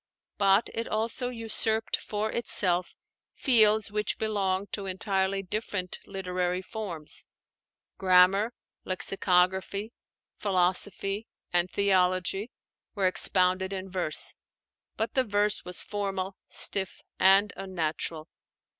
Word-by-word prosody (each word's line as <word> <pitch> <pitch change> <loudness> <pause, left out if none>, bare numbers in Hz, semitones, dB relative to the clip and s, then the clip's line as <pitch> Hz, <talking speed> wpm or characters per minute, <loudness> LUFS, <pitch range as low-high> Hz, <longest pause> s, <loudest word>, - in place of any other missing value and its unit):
But 200 +2 +4
it 230 - -3
also 230 +3 -1
usurped 225 -1 +1
for 215 +1 -3
itself 185 -6 +1 0.4
fields 220 -4 +4
which 210 -1 -1
belong 200 -3 -1
to 200 -2 -4
entirely 190 0 -1
different 195 -2 -3
literary 180 -1 -2
forms. 185 -8 -6 0.8
Grammar, 190 +4 +5 0.3
lexicography, 190 +3 +1 0.5
philosophy, 195 +2 0 0.3
and 175 +1 +2
theology 190 +2 +1 0.5
were 200 -2 0
expounded 185 0 +2
in 190 -1 -5
verse; 180 -5 +1 0.6
but 220 - -2
the 260 - +3
verse 205 -2 0
was 180 0 -3
formal, 195 -2 -3
stiff, 190 -2 +1 0.2
and 195 +2 +5
unnatural. 160 -3 -3
195 Hz, 100 wpm, -28 LUFS, 185-210 Hz, 0.8 s, Grammar